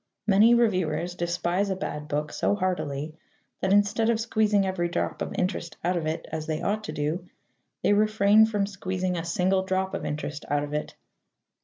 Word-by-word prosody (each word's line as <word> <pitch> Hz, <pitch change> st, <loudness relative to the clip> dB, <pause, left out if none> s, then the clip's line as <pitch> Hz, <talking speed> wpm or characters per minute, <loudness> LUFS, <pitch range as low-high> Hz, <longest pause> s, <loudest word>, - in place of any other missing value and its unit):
Many 215 Hz, +3 st, +6 dB
reviewers 180 Hz, -7 st, +1 dB
despise 175 Hz, +2 st, -1 dB
a 190 Hz, -, 0 dB
bad 150 Hz, -5 st, -5 dB
book 150 Hz, 0 st, -2 dB
so -, -, +1 dB
heartily 155 Hz, -6 st, -2 dB, 0.5 s
that, 190 Hz, -, 0 dB
instead 205 Hz, +3 st, +3 dB
of 230 Hz, -1 st, +2 dB
squeezing 215 Hz, -3 st, +2 dB
every 180 Hz, -2 st, -1 dB
drop -, -, -2 dB
of -, -, -3 dB
interest 180 Hz, -2 st, -2 dB
out 180 Hz, +2 st, +1 dB
of 165 Hz, -3 st, -1 dB
it, 160 Hz, +1 st, -3 dB
as 155 Hz, -1 st, -4 dB
they 155 Hz, -1 st, -1 dB
ought 210 Hz, +4 st, -1 dB
to -, -, -4 dB
do, 160 Hz, +5 st, -3 dB, 0.5 s
they -, -, +4 dB
refrain 215 Hz, 0 st, +5 dB
from 205 Hz, -2 st, 0 dB
squeezing 185 Hz, -2 st, -3 dB
a 165 Hz, -, -2 dB
single 185 Hz, +3 st, +1 dB
drop 190 Hz, 0 st, -1 dB
of -, -, -3 dB
interest 150 Hz, 0 st, -4 dB
out 145 Hz, +1 st, +1 dB
of 145 Hz, 0 st, -6 dB
it. 150 Hz, -, -3 dB
185 Hz, 185 wpm, -26 LUFS, 160-205 Hz, 0.5 s, Many